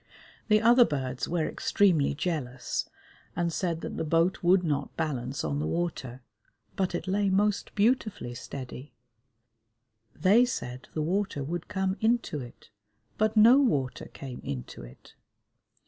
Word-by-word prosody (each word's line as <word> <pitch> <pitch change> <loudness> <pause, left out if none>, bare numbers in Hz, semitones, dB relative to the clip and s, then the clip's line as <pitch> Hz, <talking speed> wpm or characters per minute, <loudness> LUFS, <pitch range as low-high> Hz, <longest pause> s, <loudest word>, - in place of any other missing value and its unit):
The 215 -1 +4
other 240 +2 +7
birds 130 - -2
were 170 -2 0
extremely 170 -9 +2
jealous 140 -6 -3 0.5
and 170 -1 -1
said 170 -2 -1
that - - -5
the - - -1
boat 165 +4 +1
would 180 +1 +4
not 150 -4 -2
balance 135 -5 -2
on 75 -2 -1
the 75 - -1
water, 130 - -3 0.5
but 185 -2 -1
it 175 - -4
lay 200 +1 +1
most 205 +2 0
beautifully 215 - +1
steady; 130 +2 -8 1.2
they 200 +9 +5
said 130 - -4
the 155 - 0
water 185 -3 -1
would 170 +4 -4
come 190 0 -1
into 225 -8 +1
it, 120 -4 -11 0.5
but 215 +1 +1
no 235 +5 +8
water 145 - 0
came 130 -3 -9
into 65 -3 -6
it. - - -14
170 Hz, 140 wpm, -28 LUFS, 130-200 Hz, 1.2 s, no